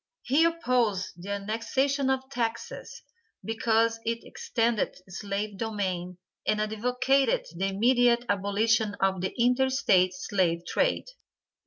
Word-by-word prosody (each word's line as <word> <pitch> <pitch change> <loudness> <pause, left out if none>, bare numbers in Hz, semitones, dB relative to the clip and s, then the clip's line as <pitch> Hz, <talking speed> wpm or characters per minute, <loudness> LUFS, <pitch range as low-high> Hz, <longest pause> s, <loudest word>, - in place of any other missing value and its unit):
He 285 +6 +3
opposed 250 - +1
the 195 - -8
annexation 230 +7 -1
of 265 0 0
Texas, 235 -2 -4 0.4
because 225 0 +1
it 230 0 -2
extended 235 - -1
slave 200 +1 -4
domain 185 -5 -3 0.3
and 215 0 +2
advocated 250 +5 +1
the 190 +3 -1
immediate 240 +4 +3
abolition 205 +2 +1
of 190 -1 +1
the 190 - -1
inter 250 +2 +3
state 185 -8 +3
slave 180 -3 0
trade. - - 0
225 Hz, 115 wpm, -27 LUFS, 200-250 Hz, 0.4 s, He